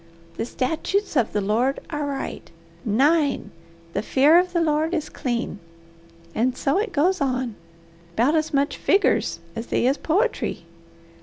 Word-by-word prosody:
The - - -2
statutes 320 +10 -1
of 245 -5 +2
the 210 - 0
Lord 230 +7 +1
are 295 -2 -2
right. 275 -1 -5 0.4
9. 285 +7 +2 0.4
The 200 - 0
fear 285 +9 +5
of 360 0 0
the 345 - +1
Lord 315 +1 +1
is 310 -2 -3
clean.' 240 -5 -3 0.7
And 250 +3 0
so 280 +7 +1
it 445 +3 -1
goes 355 +4 +2
on, 255 -3 0 0.6
'bout 250 +7 +3
as 315 -1 +1
much 280 0 0
figgers 395 +1 +2 0.2
as 225 +1 -5
they - - +1
is 270 +3 +3
poetry. 420 +9 0
285 Hz, 150 wpm, -23 LUFS, 250-325 Hz, 0.7 s, fear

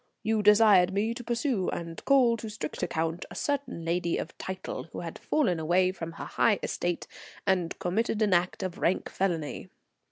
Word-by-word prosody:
You 220 0 +1
desired 205 -3 +6
me 215 +4 +1
to 245 - -8
pursue 235 -4 0
and 165 -1 -5
call 255 -4 +5
to 225 - -6
strict 180 -8 -5
account 165 +2 -1
a - - -10
certain 280 - -2
lady 170 0 0
of 160 - -5
title, 190 0 -5
who - - -8
had - - -7
fallen 190 - +1
away 180 +3 +3
from 165 -3 -7
her - - -7
high 210 -3 +2
estate 175 -1 -2 0.4
and 180 -3 +1
committed 215 +5 0
an 205 -3 +2
act 180 +2 +1
of 185 -2 -4
rank 180 - +1
felony. 170 -6 -2
185 Hz, 180 wpm, -28 LUFS, 170-220 Hz, 0.4 s, desired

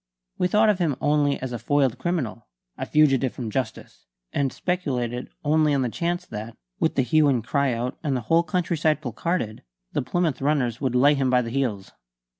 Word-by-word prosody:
We 180 - +3
thought 210 +4 +4
of 205 -3 +2
him 160 -6 +1
only 145 -1 +2
as 130 -1 -4
a 120 - -3
foiled 130 0 +1
criminal, 130 -9 -2 0.3
a - - -5
fugitive 135 -4 +3
from 115 -4 -5
justice, 130 +3 -5 0.3
and 140 -2 0
speculated 125 -10 -2 0.2
only 155 -1 +3
on 135 - +1
the 125 - 0
chance 175 +7 -2
that, 110 +2 -7 0.2
with - - +1
the - - +3
hue 150 +5 +3
and 125 -5 +2
cry 140 +1 +1
out 120 +2 -3
and 140 -4 0
the - - -3
whole 165 +9 +3
countryside 165 -2 0
placarded, 130 -3 -3 0.3
the - - +1
Plymouth 150 +1 -1
runners 135 -5 0
would 130 -3 0
lay 140 +4 +5
him 135 -2 +1
by 125 -1 +3
the 115 - -5
heels. 120 -7 -2
135 Hz, 195 wpm, -24 LUFS, 125-155 Hz, 0.3 s, lay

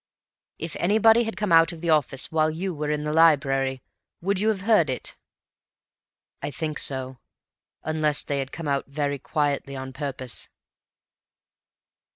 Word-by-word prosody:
"If 165 0 -5
anybody 220 +5 +4
had 225 -4 -5
come 210 -3 -1
out 165 0 +6
of 170 - -9
the 170 0 0
office 140 -3 +1
while 155 -1 +2
you 180 +4 -3
were 150 -1 -3
in 150 0 -1
the 150 0 -2
library, 135 -5 +3 0.4
would 195 +2 0
you 215 - +1
have 205 -4 -1
heard 200 -7 +3
it?" 130 - -4 1.3
"I - - -3
think 155 +2 -4
so. 130 -1 -4 0.6
Unless 155 -1 0
they 140 -1 -2
had 135 0 -4
come 165 -2 -6
out 140 -1 0
very 140 0 -2
quietly 140 -2 -1
on 130 0 -6
purpose." 130 -3 -4
150 Hz, 155 wpm, -25 LUFS, 140-170 Hz, 1.3 s, out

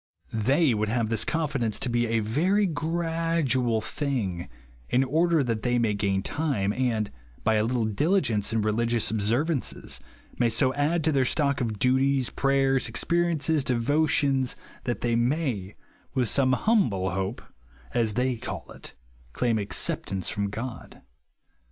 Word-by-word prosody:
They 130 +6 +3
would 105 0 -1
have 115 -1 0
this 115 - 0
confidence 140 -9 -1
to - - -2
be 120 0 +1
a 115 0 +1
very 175 - +2
gradual 165 - 0
thing, 110 - -3 0.4
in 130 +2 +3
order 160 +3 +2
that 115 -3 -2
they 120 +1 +1
may 115 -3 +1
gain 100 -2 0
time, 130 -11 -1
and, 115 -5 -1 0.3
by 110 - +3
a 105 -1 +2
little 120 0 0
diligence 115 - +1
in 110 -1 0
re 110 - +1
ligious 115 0 0
observances, 120 +8 0 0.4
may 120 - +3
so 130 +4 +2
add 150 +4 0
to 160 - +2
their 135 -3 +3
stock 140 +1 +1
of 110 -3 -2
duties, 130 +2 +2
prayers, 135 -1 +2
experiences, 160 +3 +1
devo 135 +6 +1
tions, 135 -3 +2 0.3
that 120 - -2
they 120 -1 +1
may, 120 - -1 0.4
with 125 -4 +1
some 130 -1 +3
humble 125 - +1
hope, 95 +4 -3 0.5
as 110 -3 +1
they 125 0 0
call - - -7
it, - - -11 0.4
claim 115 -3 +1
acceptance 95 -1 -2
from 100 -1 -2
God. 115 +4 -7
125 Hz, 150 wpm, -26 LUFS, 110-145 Hz, 0.5 s, They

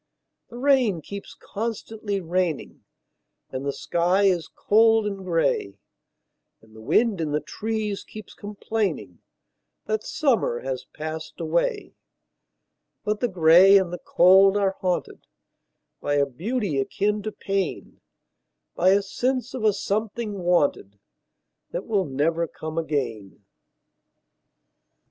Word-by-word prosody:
The 240 - -10
rain 250 - +2
keeps 200 +4 -8
constantly 220 -1 -4
raining, 175 -2 -2 0.7
And 130 - -4
the 140 - -1
sky 175 +7 +1
is 180 -4 +2
cold 225 +1 +3
and 200 -1 -2
gray, 165 - 0 0.8
And 110 0 -21
the 110 - -12
wind 210 - +2
in 150 -2 -2
the 150 - +2
trees 215 +2 -4
keeps 215 -3 -11
complainingThat 205 - -5
summer 235 - 0
has 130 -1 -4
passed 155 +1 -7
away;—But 210 - -5
the 245 - +1
gray 180 +1 +6
and 185 -3 0
the 175 - -4
cold 190 +3 +5
are 195 -1 +1
hauntedBy 180 -1 -2 1.0
a 140 - +3
beauty 180 - -2
akin 210 +9 -1
to 215 +1 -4
pain,—By 185 - -4
a 200 +1 +4
sense 255 +5 -2
of 255 - -5
a 215 - +5
something 210 +1 -3
wanted, 160 - +1 0.7
That 185 - -5
never 165 -5 0
will 170 - 0
come 155 +1 -5
again. 115 -11 -4
190 Hz, 110 wpm, -24 LUFS, 160-215 Hz, 1.0 s, gray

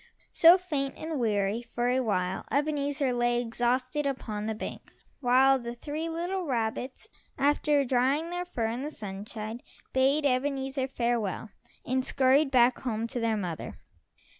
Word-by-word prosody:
So, 340 +2 +8
faint 290 -7 -3
and 315 -2 -4
weary, 210 -1 0
for 240 0 -2
a 255 +1 +2
while 190 -6 -1
Ebenezer 285 -2 0
lay 240 0 +1
exhausted 250 +4 0
upon 215 -6 -3
the 220 - -2
bank, - - -7 0.3
while 265 +1 +4
the 235 0 -6
three 305 +6 -4
little 350 +2 -3
rabbits, 250 - -2 0.3
after 290 0 +2
drying 270 +6 +1
their 355 0 -3
fur 245 -11 -3
in 230 +3 -2
the 295 - -3
sunshine, 215 0 -6 0.3
bade 275 +3 +3
Ebenezer 270 0 0
farewell 235 -5 -2 0.3
and 260 +1 0
scurried 270 +3 +3
back 250 -1 +4
home 230 -3 -2
to 250 - -2
their 225 -2 +1
mother. 175 -5 -5
255 Hz, 145 wpm, -28 LUFS, 230-285 Hz, 0.3 s, So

